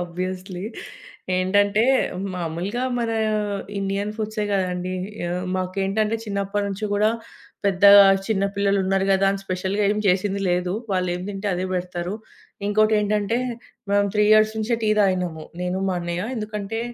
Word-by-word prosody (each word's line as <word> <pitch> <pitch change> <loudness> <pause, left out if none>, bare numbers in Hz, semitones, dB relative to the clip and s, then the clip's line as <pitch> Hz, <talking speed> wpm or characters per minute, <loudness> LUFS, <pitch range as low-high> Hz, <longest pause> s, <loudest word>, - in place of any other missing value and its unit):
Obviously. 185 +1 -5 0.7
ఏంటంటే, 205 +3 +3 0.5
మామూలుగా 180 +8 -3
మన 230 -1 -1 0.7
ఇండియన్ 195 +1 -2
ఫుడ్సే 215 -1 -2
కదండీ! 185 -1 -1 0.3
ఆహ్, 180 +1 -2
మాకేంటంటే 195 +4 0
చిన్నప్పటి 200 0 -2
నుంచి 200 +2 -4
కూడా, 210 +2 +3 0.5
పెద్ద 195 -2 0 0.4
చిన్న 200 -3 +1
పిల్లలున్నారు 195 -1 +1
కదా 195 0 +3
అని 195 - -3
స్పెషల్‌గా 190 +2 -1
ఏమీ 210 +1 0
చేసింది 195 +2 +1
లేదు. 180 0 0 0.2
వాళ్లేం 180 -1 0
తింటే 200 0 -3
అదే 180 +1 -2
పెడతారు. 180 +1 -3 0.5
ఇంకోటి 215 +1 +3
ఏంటంటే, 210 +2 0 0.5
మేము 200 0 +3
3 210 0 +4
ఇయర్స్ 215 0 +5
నుంచే 225 +2 0
టీ 215 - +2
తాగినాము. 180 -5 0 0.2
నేను, 180 +1 -1
మా - - 0
అన్నయ్య. 175 +1 -3
ఎందుకంటే 215 0 -4
195 Hz, 130 wpm, -23 LUFS, 185-210 Hz, 0.7 s, ఇయర్స్